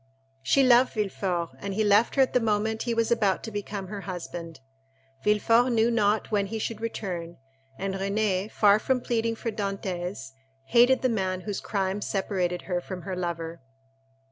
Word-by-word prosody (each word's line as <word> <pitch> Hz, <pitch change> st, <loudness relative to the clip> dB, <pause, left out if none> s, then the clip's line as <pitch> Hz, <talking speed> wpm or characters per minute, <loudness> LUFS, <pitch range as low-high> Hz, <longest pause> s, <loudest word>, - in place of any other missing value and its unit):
She 135 Hz, -, +3 dB
loved 250 Hz, 0 st, +5 dB
Villefort, 190 Hz, -5 st, -1 dB
and 200 Hz, -1 st, -4 dB
he 220 Hz, -, +2 dB
left 210 Hz, +2 st, +4 dB
her 270 Hz, -, +6 dB
at 260 Hz, -, -2 dB
the 250 Hz, -, +4 dB
moment 220 Hz, 0 st, 0 dB
he 235 Hz, -, -1 dB
was 230 Hz, 0 st, +1 dB
about 200 Hz, -5 st, +2 dB
to 225 Hz, -, -6 dB
become 205 Hz, -1 st, -4 dB
her 205 Hz, -1 st, -5 dB
husband. 175 Hz, -3 st, -7 dB, 0.6 s
Villefort 230 Hz, +4 st, +3 dB
knew 230 Hz, 0 st, +3 dB
not 215 Hz, -2 st, +1 dB
when 200 Hz, -2 st, +1 dB
he 225 Hz, -, -4 dB
should 220 Hz, 0 st, -4 dB
return, 175 Hz, -7 st, -4 dB, 0.4 s
and 195 Hz, 0 st, -3 dB
Renée, 195 Hz, 0 st, 0 dB
far 205 Hz, -1 st, +4 dB
from 260 Hz, +3 st, +1 dB
pleading 230 Hz, -1 st, 0 dB
for 230 Hz, 0 st, -4 dB
Dantès, 190 Hz, -8 st, -4 dB, 0.4 s
hated 245 Hz, +2 st, +5 dB
the 255 Hz, -, +3 dB
man 190 Hz, -5 st, -1 dB
whose 205 Hz, 0 st, -4 dB
crime 195 Hz, 0 st, -2 dB
separated 185 Hz, -3 st, -1 dB
her 180 Hz, -2 st, -2 dB
from 180 Hz, -1 st, -7 dB
her 190 Hz, -2 st, -4 dB
lover. 170 Hz, -2 st, -4 dB
205 Hz, 170 wpm, -27 LUFS, 185-225 Hz, 0.6 s, her